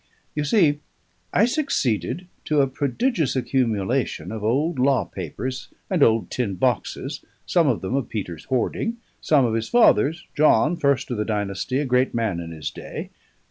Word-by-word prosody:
You 150 0 -1
see, 150 -4 +3 0.5
I 205 - +4
succeeded 185 - -1 0.2
to 150 -2 +3
a - - +4
prodigious 145 - 0
accumulation 125 -2 0
of 110 -2 -5
old 135 +7 +1
law 130 -1 +3
papers 125 - -5 0.2
and 180 -5 +1
old 115 -3 +3
tin 110 -7 -1
boxes, - - -1 0.2
some 170 -3 +3
of 125 -5 +1
them 95 +5 -3
of 135 -3 -1
Peter's 90 -7 -5
hoarding, 180 - -1 0.2
some 145 -5 +4
of 115 - 0
his 115 0 -2
father's, 165 - +4
John, 150 +1 +4
first 140 -6 +1
of 120 - -2
the 105 - 0
dynasty, 105 +3 -2
a 145 - 0
great 125 0 +1
man 110 -7 0
in 85 -1 -6
his 80 -2 -5
day. - - -7
130 Hz, 165 wpm, -23 LUFS, 110-150 Hz, 0.5 s, I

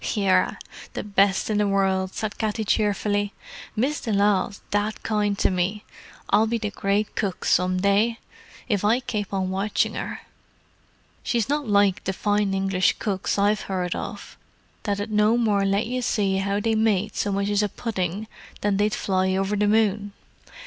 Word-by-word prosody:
"Yerra, 200 -3 +2 0.4
the - - -4
best 200 -1 +2
in 215 -1 0
the 210 - +2
world," 190 -1 +1
said 215 -2 -4
Katty 220 0 -1
cheerfully. 205 -1 0 0.4
"Miss 270 +7 0
de 225 - -3
Lisle's 200 -1 +1
that 205 +1 -1
kind 210 -2 0
to - - +2
me—I'll 200 +3 -1
be 235 +1 0
the 210 -2 -3
great 200 +1 -1
cook 195 -3 -2
some 185 +1 +2
day, 205 +4 +2 0.5
if 205 -4 0
I 225 +5 +3
kape 210 -5 -3
on 190 -1 -1
watchin' 195 +3 0
her. - - -5 1.0
She's 235 -3 0
not 290 -2 -1
like 200 -2 +3
the 190 - -1
fine 205 0 0
English 190 -1 +2
cooks 195 -2 -2
I've 205 +1 +2
heard 180 -2 -1
of, - - -7 0.5
that 205 -1 0
'ud 205 +2 -4
no 210 +2 +3
more 210 -4 +2
let 195 +1 +1
you 250 +2 -2
see 200 -5 +1
how 200 +1 0
they 225 +2 0
made 215 -2 +1
so 205 - -1
much 200 +1 0
as 205 0 +2
a 210 - 0
pudding 195 -2 -3 0.4
than 205 -1 +1
they'd 210 +1 +1
fly 190 -1 0
over 195 +2 0
the 210 0 +2
moon. 205 -1 +1
205 Hz, 170 wpm, -24 LUFS, 195-215 Hz, 1.0 s, I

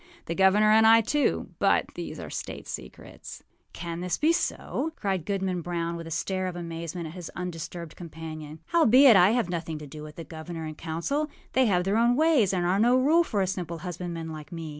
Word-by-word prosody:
The 165 - -3
governor 195 +4 +4
and 220 +1 +6
I, 225 0 +7
tooâBut 295 +6 +1
these - - -6
are - - -7
state - - -6
secrets.â - - -10
âCan 170 0 -5
this 180 -1 -1
be 315 +2 +3
so?â 320 -1 -2
cried 190 -5 -2
Goodman 190 -3 -1
Brown, 170 0 -3
with 165 -1 -7
a - - -7
stare 185 +3 -2
of 180 - -5
amazement 170 0 -5
at 155 - -7
his 175 -2 -7
undisturbed 170 -2 -6
companion. 160 -2 -8
âHowbeit, 265 -6 +7
I 185 0 +7
have 240 -6 +1
nothing 165 -2 -3
to 150 - -8
do 150 +2 -10
with 150 0 -10
the 165 - -7
governor 160 0 -7
and 155 0 -6
council; 170 - -2 0.2
they 260 -1 +4
have 180 -3 +2
their 195 +3 +1
own 235 +1 +4
ways, 295 - +3
and 180 -2 0
are 185 +3 +2
no 240 +3 +4
rule 310 +6 +4
for 210 -11 -1
a - - +1
simple 180 -3 -4
husbandman 170 -2 -5
like 155 -1 -9
me. 165 -2 -6
180 Hz, 205 wpm, -27 LUFS, 165-215 Hz, 0.2 s, I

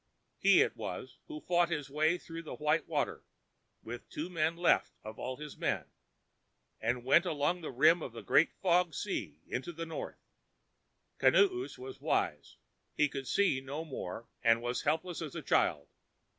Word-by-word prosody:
He - - +6
it - - -3
was - - -6
who 310 -1 -7
fought 175 -1 +2
his 150 -5 -2
way 155 +4 +2
through 165 -1 -8
the 160 - -7
white 150 +2 +1
water, - - -1 0.6
with 120 +1 -8
two 165 +4 -5
men 165 0 0
left 175 - +3
of 110 0 -8
all 130 +1 -3
his 150 -1 -8
men, - - -2 0.9
and 120 +2 -1
went 140 +6 +6
away 165 - 0
along 150 +5 0
the 155 - -5
rim 155 +7 +5
of 130 - -5
the 115 0 -9
Great 160 - +4
Fog 180 -3 +3
Sea 95 - -3
into 130 +7 -4
the 165 0 -5
north. 165 -1 -6 1.0
Kinoos 380 -1 +3
was 390 +1 -9
wise. - - -1 0.4
He 150 - +4
could 135 -2 -5
see 185 -8 +2
no 140 +4 -5
more 115 - -6
and 115 -1 +4
was 120 +1 -1
helpless 160 +3 -1
as 155 -4 -6
a - - -5
child. - - +2
155 Hz, 170 wpm, -32 LUFS, 130-175 Hz, 1.0 s, He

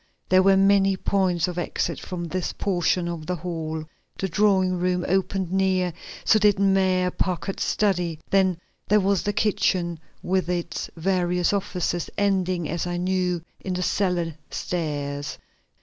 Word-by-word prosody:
there 185 0 +6
were 195 0 +5
many 195 0 +4
points 185 -4 +1
of 180 -1 -3
exit 175 - -2
from 180 -2 -5
this 175 +1 -3
portion 180 -2 0
of 165 -3 -5
the 180 - -1
hall. 160 -2 -4 0.3
The 190 - -1
drawing 190 -1 +2
room 180 0 0
opened 190 -1 0
near; 185 -2 +1 0.3
so 215 - +5
did 205 -1 +4
Mayor 190 -2 +2
Packard's 185 +2 -2
study; 175 -6 0
then 190 -3 +3 0.3
there 210 +1 +5
was 195 -1 +2
the 205 - 0
kitchen 185 -5 +1 0.2
with 185 -1 0
its 175 -1 -3
various 180 +1 +1
offices, 180 -3 -1
ending 185 -4 +1
as 170 +2 -2
I 175 0 -2
knew 180 -1 0 0.2
in 185 -1 -3
the 180 - -1
cellar 180 -4 0 0.2
stairs. 145 -4 -3
180 Hz, 150 wpm, -24 LUFS, 175-195 Hz, 0.3 s, there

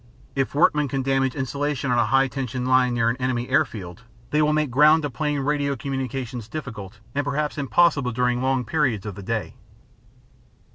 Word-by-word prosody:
If 135 0 -1
workmen 150 -1 +3
can 135 0 -2
damage 135 -1 +1
insulation 140 0 -2
on 120 - +3
a 115 - +2
high 135 +3 +3
tension 125 -1 -4
line 130 -1 +3
near 115 -1 +2
an 115 +2 0
enemy 125 -1 -1
airfield, 90 -5 -1 0.3
they 150 - +3
will 150 0 +3
make 150 -3 0
ground 150 +5 +5
to 145 - -2
plane 145 +1 -1
radio 140 0 0
communications 130 -3 -4
difficult 115 -8 -7 0.2
and 145 - 0
perhaps 145 +1 -2
impossible 145 -2 +2
during 125 +1 0
long 130 -1 0
periods 125 -7 0
of 105 - -4
the 100 - -9
day. 110 +1 -3
135 Hz, 180 wpm, -23 LUFS, 120-145 Hz, 0.3 s, ground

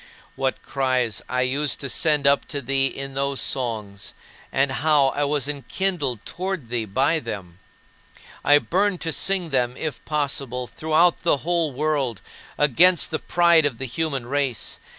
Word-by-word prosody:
What 135 0 -2
cries 130 -5 0
I 125 0 0
used 140 +2 0
to 140 - -3
send 150 +1 +1
up 140 0 +4
to 145 - -3
thee 135 0 +1
in 135 0 -6
those 140 0 -1
songs, 110 -6 -3 0.4
and 135 0 +2
how 145 0 +3
I 145 +2 -1
was 145 -1 0
enkindled 145 - -2
toward 180 -8 -4
thee 120 -2 -2
by 135 +10 +1
them! 100 - -7 0.8
I 145 - +6
burned 190 +4 0
to 165 -1 -2
sing 185 -4 +1
them 125 -2 0
if 155 -2 -5
possible, 140 -4 -2
throughout 160 +6 +2
the 165 - +2
whole 170 -3 +1
world, 135 -5 -1 0.4
against 165 +5 +4
the 155 - -1
pride 170 -2 +4
of 125 -5 -5
the 130 - -4
human 135 0 -2
race. 135 -3 -2
140 Hz, 155 wpm, -23 LUFS, 125-155 Hz, 0.8 s, I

